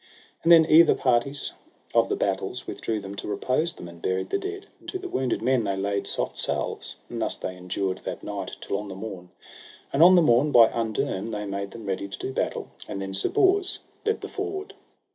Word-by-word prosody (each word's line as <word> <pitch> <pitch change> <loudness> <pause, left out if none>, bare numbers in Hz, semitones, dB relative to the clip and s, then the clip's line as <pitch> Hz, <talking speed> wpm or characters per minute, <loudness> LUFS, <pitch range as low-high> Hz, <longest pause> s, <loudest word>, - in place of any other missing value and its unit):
And 170 - +3
then 165 -1 +9
either 165 +1 +7
parties 130 +2 +1 0.4
of - - +4
the - - +1
battles - - -2
withdrew 110 -1 -3
them 100 0 -7
to 95 - -5
repose 130 +10 0
them, 85 - -9
and 85 0 -12
buried 95 0 -1
the 395 - +1
dead, 395 0 -5
and - - -10
to - - -3
the 370 0 -6
wounded 130 - -1
men 130 -1 +3
they 100 - -1
laid 100 +1 -1
soft - - -2
salves; - - -1
and - - -5
thus - - +1
they 90 - -5
endured 95 +1 -2
that - - -6
night 100 -2 -5
till 100 - -2
on 105 - -6
the 95 - -7
morn. 95 -3 -7 0.6
And 140 - +3
on 180 +2 +9
the 175 - +6
morn 135 +2 +4
by 115 -4 +8
underne 110 -2 -2
they 105 -1 -3
made 100 0 -3
them 115 0 -10
ready 100 0 -2
to 100 - -7
do 130 - -4
battle. - - -2 0.2
And 100 - -4
then 95 0 -4
Sir 95 - 0
Bors 385 +1 +2 0.2
led 440 0 0
the - - -5
forward. 400 0 -5
115 Hz, 220 wpm, -26 LUFS, 100-165 Hz, 0.6 s, then